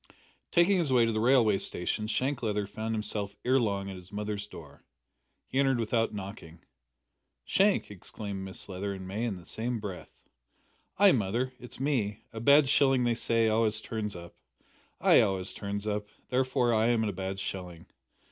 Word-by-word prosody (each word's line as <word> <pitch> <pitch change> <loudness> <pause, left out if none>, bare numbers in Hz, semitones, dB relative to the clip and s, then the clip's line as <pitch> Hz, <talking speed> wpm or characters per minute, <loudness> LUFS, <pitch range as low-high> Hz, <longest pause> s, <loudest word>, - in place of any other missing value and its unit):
Taking 180 +2 +4
his 160 -6 0
way 120 -2 +5
to 115 - +1
the 110 - -1
railway 115 -4 +4
station 105 +4 -3
Shank 130 +5 -1
Leather 105 -3 -1
found 110 +2 -4
himself 105 -2 -3
ere 130 +2 +4
long 100 -4 -1
at 95 - -6
his 90 +1 -13
mother's 105 0 -4
door. 80 -8 -13 0.6
He 135 - -2
entered 135 -3 +3
without 115 0 +1
knocking. 95 -5 -8 0.8
"Shank!" 195 - +2
exclaimed 100 0 -6
Mrs 95 - -4
Leather 100 +1 -3
and 95 -1 -8
May 105 +5 -2
in 105 -5 -2
the 85 - -13
same 115 +4 -2
breath. 100 -4 -7 0.9
"Ay, 200 0 +7
mother, 120 - 0
it's 125 -1 -10
me. 120 -7 -1
A 110 - -5
bad 140 +4 +6
shilling, 135 -2 +4
they 120 -1 +2
say, 115 0 +2
always 110 0 +2
turns 110 -2 -4
up. 85 0 -10 0.7
I - - +6
always 95 -1 -1
turn 100 0 -4
up, 105 0 -2 0.2
therefore 125 -2 +2
I 110 +1 +3
am 120 -2 +2
a 105 -2 -1
bad 95 +1 -4
shilling! 90 -4 -5
110 Hz, 175 wpm, -29 LUFS, 100-125 Hz, 0.9 s, Ay